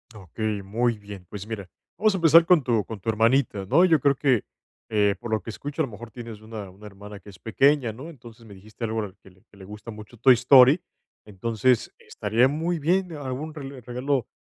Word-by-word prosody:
Okey, 105 +2 -4
muy 115 +4 0
bien. 100 -3 -11
Pues 100 -1 -7
mira, 100 -5 -6 0.3
vamos 215 -1 +3
a - - 0
empezar 165 -1 +6
con 175 -4 +4
tu 115 -5 0
con 110 -2 -8
tu 110 - -3
hermanita, 110 -2 +1
¿no? 145 - +4
Yo 165 -4 +4
creo 140 +1 +2
que, 130 -5 +1 0.4
eh, 105 -2 +2
por 120 - -7
lo 110 -1 0
que - - -9
escucho, 145 +7 -5
a - - +2
lo 125 - -11
mejor 115 +2 -10
tienes 115 -2 -9
una 110 -2 -8
una 100 +3 -13
hermana 100 0 -11
que 105 - -15
es 95 - -14
pequeña, 135 +3 +2
¿no? 130 +9 -10
Entonces, 120 -6 -14
me 105 - -13
dijiste 110 +4 -8
algo 110 0 -2 0.2
que 95 - -18
le 95 +2 -26
que 100 - -20
le 95 - -12
gusta 105 +3 -10
mucho 105 +2 -12
Toy 130 +3 +6
Story. 130 +5 +6 0.4
Entonces, 115 +4 0
estaría 110 +5 +1
muy 165 +4 -2
bien, 180 +4 0
algún 145 +1 -5
rele 140 -4 -9
regalo, 125 +1 -2
115 Hz, 215 wpm, -25 LUFS, 105-140 Hz, 0.4 s, empezar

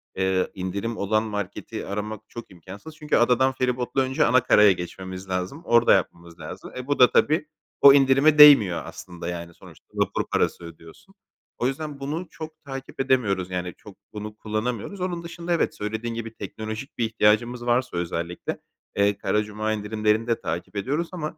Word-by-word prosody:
eee, 95 -1 0
indirim 100 +5 -4
olan 110 +2 +1
marketi 105 +1 -5
aramak 105 +1 -4
çok 120 -3 -10
imkânsız. 95 - -11
Çünkü 155 -1 -1
adadan 125 +2 +3
feribotla 125 0 -1
önce 130 0 +1
ana 125 +1 +4
karaya 105 -1 +6
geçmemiz 95 +1 -6
lazım. 90 - -3
Orada 120 0 +5
yapmamız 85 0 -2
lazım. 75 - -9
E, 130 0 -6
bu 145 - 0
da 125 - +7
tabii 155 0 +2 0.3
o 140 - +10
indirime 140 +2 +4
değmiyor 115 -13 +8
aslında. 90 -2 -9
Yani 85 -1 -6
sonuçta - - -17
vapur - - -1
parası - - 0
ödüyorsun. 85 - -14 0.4
O 120 - 0
yüzden 145 +1 -5
bunu 155 +6 -4
çok 155 0 -10
takip 135 -1 -8
edemiyoruz, 100 -9 +1
yani 90 -1 -3
çok 105 -2 -14 0.2
bunu 105 0 -7
kullanamıyoruz. 110 - -4
Onun 175 -2 -3
dışında 170 +1 -4
evet, 170 - 0
söylediğin 110 +3 -4
gibi, 115 -1 -6
teknolojik 110 +5 -7
bir 115 - +1
ihtiyacımız 115 +2 +1
varsa 120 -5 0
özellikle, 85 0 -4 0.4
eee, 100 0 +2
Kara 105 - 0
Cuma 105 +1 -3
indirimlerini 110 +1 0
de 115 -1 0
takip 85 +5 -5
ediyoruz 145 +11 -2
ama 155 -4 -5
110 Hz, 165 wpm, -24 LUFS, 95-135 Hz, 0.4 s, o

